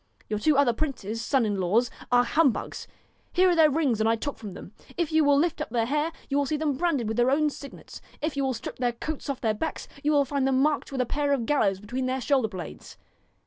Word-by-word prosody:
Your 210 Hz, -1 st, -1 dB
two 300 Hz, +5 st, +3 dB
other 275 Hz, -4 st, +4 dB
princes, 230 Hz, -5 st, -3 dB
sons 265 Hz, -5 st, +2 dB
in 205 Hz, -2 st, -1 dB
law, 185 Hz, +5 st, +3 dB, 0.3 s
are 245 Hz, 0 st, +5 dB
humbugs. 275 Hz, -1 st, 0 dB, 0.5 s
Here 370 Hz, 0 st, +4 dB
are -, -, +2 dB
their 320 Hz, -2 st, +6 dB
rings 275 Hz, -7 st, +1 dB
that 220 Hz, -, +2 dB
I 225 Hz, -, +3 dB
took 285 Hz, +5 st, -4 dB
from 210 Hz, -4 st, -7 dB
them. -, -, -10 dB, 0.3 s
If 340 Hz, -3 st, -1 dB
you 315 Hz, 0 st, +4 dB
will 285 Hz, -1 st, +4 dB
lift 330 Hz, +3 st, +1 dB
up -, -, -3 dB
their 230 Hz, -1 st, 0 dB
hair 300 Hz, +6 st, 0 dB, 0.2 s
you 280 Hz, -, 0 dB
will 285 Hz, -, 0 dB
see 305 Hz, -, 0 dB
them 295 Hz, -2 st, 0 dB
branded 285 Hz, -6 st, 0 dB
with 220 Hz, +1 st, -2 dB
their 240 Hz, +1 st, +4 dB
own 300 Hz, +2 st, +2 dB
signets. 280 Hz, 0 st, -11 dB, 0.2 s
If 310 Hz, -1 st, -2 dB
you 280 Hz, -, 0 dB
will 260 Hz, -2 st, 0 dB
strip 230 Hz, -, -7 dB
their 245 Hz, -1 st, 0 dB
coats 295 Hz, +5 st, -5 dB
off 275 Hz, -, -3 dB
their 220 Hz, -2 st, +1 dB
backs, 315 Hz, +10 st, -4 dB, 0.2 s
you 300 Hz, -, +2 dB
will 285 Hz, -2 st, +4 dB
find 275 Hz, -1 st, 0 dB
them 265 Hz, -1 st, +2 dB
marked 295 Hz, +1 st, +1 dB
with 265 Hz, -2 st, -1 dB
a -, -, +1 dB
pair 285 Hz, +3 st, 0 dB
of 250 Hz, -5 st, -1 dB
gallows 210 Hz, -9 st, +1 dB
between 250 Hz, +6 st, -3 dB
their 260 Hz, +1 st, -1 dB
shoulder 260 Hz, -2 st, +2 dB
blades. 185 Hz, -6 st, -9 dB
270 Hz, 255 wpm, -26 LUFS, 230-295 Hz, 0.5 s, their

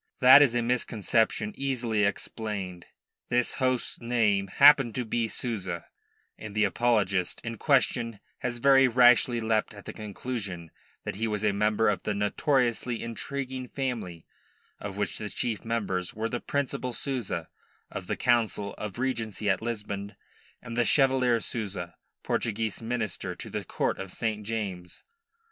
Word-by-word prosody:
That 130 Hz, +3 st, +9 dB
is 130 Hz, -5 st, +4 dB
a 120 Hz, -, +2 dB
misconception 115 Hz, -2 st, +1 dB
easily 120 Hz, -6 st, 0 dB
explained. 100 Hz, -3 st, -4 dB, 0.4 s
This 125 Hz, 0 st, +2 dB
host's 130 Hz, -1 st, +1 dB
name 110 Hz, -5 st, +2 dB
happened 135 Hz, +1 st, +6 dB
to 125 Hz, -, -2 dB
be 115 Hz, +1 st, 0 dB
Souza, 95 Hz, -8 st, -3 dB, 0.5 s
and 105 Hz, -2 st, -8 dB
the 105 Hz, -, +3 dB
apologist 100 Hz, -4 st, +1 dB
in 115 Hz, -1 st, -5 dB
question 120 Hz, -5 st, +2 dB, 0.2 s
has 120 Hz, -1 st, -3 dB
very 135 Hz, +1 st, +6 dB
rashly 120 Hz, 0 st, +5 dB
leapt 110 Hz, -2 st, 0 dB
at 100 Hz, -, -12 dB
the -, -, -6 dB
conclusion 100 Hz, -5 st, -6 dB, 0.3 s
that -, -, -5 dB
he 115 Hz, +1 st, 0 dB
was 105 Hz, -1 st, -2 dB
a 105 Hz, -1 st, +3 dB
member 105 Hz, +2 st, +2 dB
of 100 Hz, -4 st, +1 dB
that 105 Hz, -, -2 dB
notoriously 120 Hz, +2 st, 0 dB
intriguing 130 Hz, +2 st, -4 dB
family, 115 Hz, -, -4 dB, 0.5 s
of 100 Hz, -1 st, -6 dB
which 105 Hz, -2 st, -2 dB
the 105 Hz, -, -4 dB
chief 110 Hz, 0 st, -2 dB
members 100 Hz, -6 st, -2 dB
were 110 Hz, +1 st, -2 dB
the 120 Hz, -, -2 dB
Principal 130 Hz, -3 st, -2 dB
Souza, 115 Hz, -, -3 dB, 0.4 s
of 90 Hz, -, -6 dB
the -, -, -2 dB
Council 115 Hz, -4 st, +1 dB
of 105 Hz, -1 st, -5 dB
Regency 115 Hz, -5 st, -2 dB
at 95 Hz, -, -1 dB
Lisbon, 105 Hz, -3 st, -4 dB, 0.5 s
and 115 Hz, -1 st, -6 dB
the 120 Hz, -, +3 dB
Chevalier 130 Hz, -3 st, +3 dB
Souza, 100 Hz, -7 st, -4 dB, 0.3 s
Portuguese 110 Hz, -1 st, -1 dB
minister 115 Hz, -3 st, -3 dB
to -, -, -9 dB
the -, -, -3 dB
Court -, -, -1 dB
of 95 Hz, -1 st, -6 dB
St. 110 Hz, -1 st, -2 dB
James's. 95 Hz, -6 st, -5 dB
115 Hz, 150 wpm, -28 LUFS, 100-125 Hz, 0.5 s, That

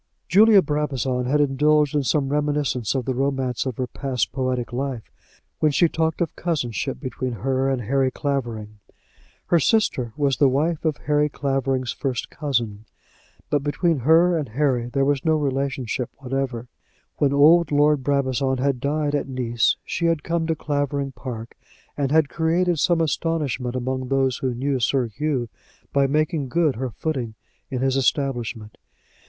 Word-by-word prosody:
Julia 205 Hz, +2 st, +6 dB
Brabazon 135 Hz, -4 st, -1 dB
had 145 Hz, +4 st, +1 dB
indulged 145 Hz, +1 st, +3 dB
in 145 Hz, -, +2 dB
some 135 Hz, +1 st, 0 dB
reminiscence 145 Hz, -5 st, 0 dB
of 130 Hz, -3 st, -1 dB
the 130 Hz, -, -1 dB
romance 135 Hz, -1 st, -1 dB
of 125 Hz, -, -4 dB
her 130 Hz, -, -1 dB
past 130 Hz, 0 st, -2 dB
poetic 130 Hz, -2 st, -2 dB
life 130 Hz, -3 st, -4 dB, 0.5 s
when 155 Hz, -, +3 dB
she 170 Hz, +4 st, +4 dB
talked 160 Hz, 0 st, -1 dB
of 170 Hz, -, -1 dB
cousinship 135 Hz, -6 st, -2 dB
between 130 Hz, -2 st, -4 dB
her 130 Hz, +4 st, 0 dB
and 130 Hz, -3 st, -1 dB
Harry 135 Hz, +4 st, +1 dB
Clavering. 115 Hz, -7 st, -4 dB, 0.7 s
Her 170 Hz, -, +3 dB
sister 140 Hz, -, +1 dB
was 140 Hz, -3 st, +1 dB
the 140 Hz, -, +5 dB
wife 155 Hz, +5 st, 0 dB
of 155 Hz, -3 st, +1 dB
Harry 150 Hz, 0 st, +2 dB
Clavering's 135 Hz, -3 st, -1 dB
first 130 Hz, -4 st, -3 dB
cousin, 115 Hz, -8 st, -2 dB, 0.7 s
but 145 Hz, -, +2 dB
between 150 Hz, +2 st, 0 dB
her 165 Hz, +7 st, +4 dB
and 150 Hz, -6 st, -2 dB
Harry 125 Hz, -1 st, 0 dB
there 135 Hz, +2 st, 0 dB
was 140 Hz, -1 st, +1 dB
no 160 Hz, -1 st, +3 dB
relationship 135 Hz, -4 st, -2 dB
whatever. 130 Hz, -3 st, -3 dB, 0.5 s
When 140 Hz, -2 st, +2 dB
old 150 Hz, +3 st, +5 dB
Lord 145 Hz, -1 st, +3 dB
Brabazon 135 Hz, -1 st, 0 dB
had 135 Hz, 0 st, 0 dB
died 145 Hz, +2 st, -1 dB
at 145 Hz, -, -1 dB
Nice 120 Hz, -3 st, +1 dB
she 170 Hz, -, -1 dB
had 165 Hz, -3 st, 0 dB
come 165 Hz, -1 st, -1 dB
to 160 Hz, -, +1 dB
Clavering 145 Hz, -2 st, -2 dB
Park, 115 Hz, -1 st, -7 dB, 0.4 s
and 140 Hz, -2 st, -1 dB
had 155 Hz, -1 st, +4 dB
created 170 Hz, +2 st, +1 dB
some 170 Hz, 0 st, +2 dB
astonishment 145 Hz, -5 st, -1 dB
among 130 Hz, +1 st, -2 dB
those 135 Hz, -2 st, +1 dB
who 130 Hz, -2 st, -2 dB
knew 135 Hz, +2 st, -1 dB
Sir 130 Hz, +1 st, +1 dB
Hugh 130 Hz, +2 st, -2 dB, 0.5 s
by 140 Hz, -1 st, +3 dB
making 150 Hz, -1 st, 0 dB
good 155 Hz, 0 st, +2 dB
her 130 Hz, +1 st, -2 dB
footing 125 Hz, -4 st, -4 dB, 0.3 s
in 130 Hz, -2 st, -3 dB
his 135 Hz, -1 st, +1 dB
establishment. 120 Hz, -5 st, -1 dB
135 Hz, 160 wpm, -23 LUFS, 130-150 Hz, 0.7 s, Julia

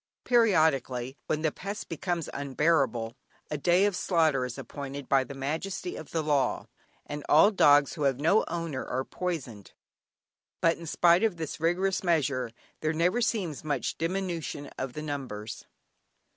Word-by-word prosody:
Periodically, 155 Hz, -, +2 dB
when 155 Hz, 0 st, -1 dB
the 155 Hz, -, +2 dB
pest 200 Hz, +6 st, -6 dB
becomes 170 Hz, 0 st, -2 dB
unbearable, 140 Hz, -5 st, +1 dB, 0.4 s
a 150 Hz, -, -1 dB
day 175 Hz, +5 st, +4 dB
of 205 Hz, -2 st, +1 dB
slaughter 155 Hz, -9 st, +2 dB
is 125 Hz, -1 st, -6 dB
appointed 140 Hz, -1 st, -7 dB
by 135 Hz, -1 st, +4 dB
the 135 Hz, +2 st, -9 dB
Majesty 160 Hz, +7 st, -3 dB
of 155 Hz, -, -8 dB
the 160 Hz, -1 st, -1 dB
Law, 145 Hz, -3 st, +1 dB, 0.4 s
and 150 Hz, 0 st, -6 dB
all 180 Hz, +8 st, +7 dB
dogs 145 Hz, -7 st, +5 dB
who 160 Hz, -, -7 dB
have 135 Hz, -2 st, +2 dB
no 165 Hz, +9 st, +4 dB
owner 165 Hz, -6 st, -3 dB
are 130 Hz, +1 st, -2 dB
poisoned. 135 Hz, -, -5 dB, 0.9 s
But 165 Hz, 0 st, +3 dB
in 170 Hz, -, -8 dB
spite 175 Hz, +5 st, +4 dB
of 215 Hz, -6 st, +1 dB
this 160 Hz, -2 st, -5 dB
rigorous 180 Hz, +4 st, +1 dB
measure, 140 Hz, -8 st, +1 dB, 0.3 s
there 155 Hz, 0 st, 0 dB
never 180 Hz, +9 st, +2 dB
seems 195 Hz, -, -1 dB
much 145 Hz, -4 st, -1 dB
diminution 170 Hz, -4 st, -3 dB
in 130 Hz, -1 st, -3 dB
the 150 Hz, +4 st, -6 dB
numbers. 125 Hz, -8 st, -5 dB
155 Hz, 155 wpm, -28 LUFS, 135-175 Hz, 0.9 s, all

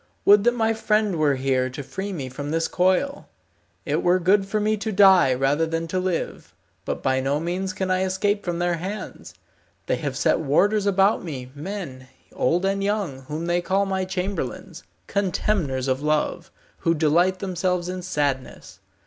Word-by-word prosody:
Would 205 Hz, +1 st, +6 dB
that 240 Hz, 0 st, +3 dB
my 225 Hz, -1 st, +1 dB
friend 215 Hz, -4 st, +1 dB
were 150 Hz, -3 st, +2 dB
here 130 Hz, -1 st, 0 dB
to 135 Hz, +3 st, -7 dB
free 195 Hz, +8 st, -5 dB
me 145 Hz, -8 st, -4 dB
from 140 Hz, +3 st, -6 dB
this 165 Hz, +1 st, 0 dB
coil. 190 Hz, +11 st, 0 dB, 0.6 s
It -, -, 0 dB
were 180 Hz, +1 st, +3 dB
good 195 Hz, +2 st, +2 dB
for 215 Hz, +2 st, -1 dB
me 215 Hz, +1 st, +1 dB
to 220 Hz, +1 st, -3 dB
die 190 Hz, -7 st, +6 dB
rather 140 Hz, +5 st, +1 dB
than 165 Hz, +1 st, -2 dB
to 185 Hz, -, -1 dB
live, 185 Hz, -2 st, -3 dB, 0.3 s
but -, -, -4 dB
by 130 Hz, 0 st, +2 dB
no 135 Hz, +2 st, 0 dB
means 180 Hz, +3 st, -2 dB
can 185 Hz, 0 st, -2 dB
I 185 Hz, 0 st, +2 dB
escape 200 Hz, +2 st, 0 dB
from 175 Hz, -2 st, -2 dB
their 175 Hz, 0 st, 0 dB
hands. 195 Hz, +5 st, -7 dB, 0.5 s
They -, -, 0 dB
have -, -, -4 dB
set -, -, +2 dB
warders 195 Hz, +8 st, +2 dB
about 195 Hz, +1 st, +3 dB
me, 130 Hz, -7 st, -6 dB
men, 145 Hz, -5 st, -7 dB, 0.3 s
old 175 Hz, +8 st, +1 dB
and 195 Hz, 0 st, 0 dB
young, 200 Hz, -9 st, -1 dB
whom 155 Hz, +3 st, -4 dB
they 175 Hz, +1 st, +1 dB
call 195 Hz, +3 st, +1 dB
my 190 Hz, -1 st, -1 dB
chamberlains, 190 Hz, +1 st, -4 dB, 0.2 s
contemners 180 Hz, -9 st, -1 dB
of 130 Hz, +1 st, 0 dB
love, 150 Hz, 0 st, -1 dB, 0.3 s
who 165 Hz, -1 st, +1 dB
delight 170 Hz, +4 st, +2 dB
themselves 180 Hz, -2 st, -1 dB
in 185 Hz, 0 st, -4 dB
sadness. 145 Hz, -7 st, -3 dB
180 Hz, 175 wpm, -23 LUFS, 150-195 Hz, 0.6 s, Would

